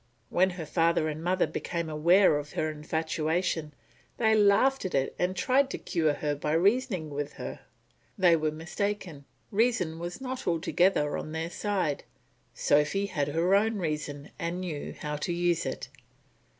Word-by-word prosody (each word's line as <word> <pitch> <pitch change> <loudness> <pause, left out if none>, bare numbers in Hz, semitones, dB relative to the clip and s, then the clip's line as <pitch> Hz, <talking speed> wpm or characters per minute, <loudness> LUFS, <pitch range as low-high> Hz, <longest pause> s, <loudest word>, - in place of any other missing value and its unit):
When 185 +2 +4
her 165 - -4
father 165 0 +2
and 155 +1 -5
mother 180 +1 +2
became 170 -2 -3
aware 160 +1 +4
of 145 0 -9
her 155 0 -1
infatuation, 160 +1 -1 0.5
they 220 -2 +3
laughed 215 +6 +4
at 185 - -2
it 135 0 0
and 180 +1 0
tried 260 +8 +2
to - - -4
cure 155 -3 0
her 150 0 -1
by 150 +1 -2
reasoning 190 - +1
with 145 0 -4
her. - - -7 0.6
They 180 -4 +5
were 155 -1 0
mistaken, 165 -1 -4 0.3
reason 195 -7 +1
was 175 +5 -5
not 260 -1 -5
altogether 170 -2 +2
on 155 - -7
their 165 +1 -3
side; 185 -9 -1 0.5
Sophy 150 +7 +2
had 150 -8 -1
her 165 +5 +1
own 215 +2 +3
reason 150 -4 -4
and 170 +2 -2
knew 160 -6 -5
how 150 0 -3
to 150 - -3
use 170 -2 +1
it. 130 - -4
170 Hz, 160 wpm, -28 LUFS, 155-195 Hz, 0.6 s, They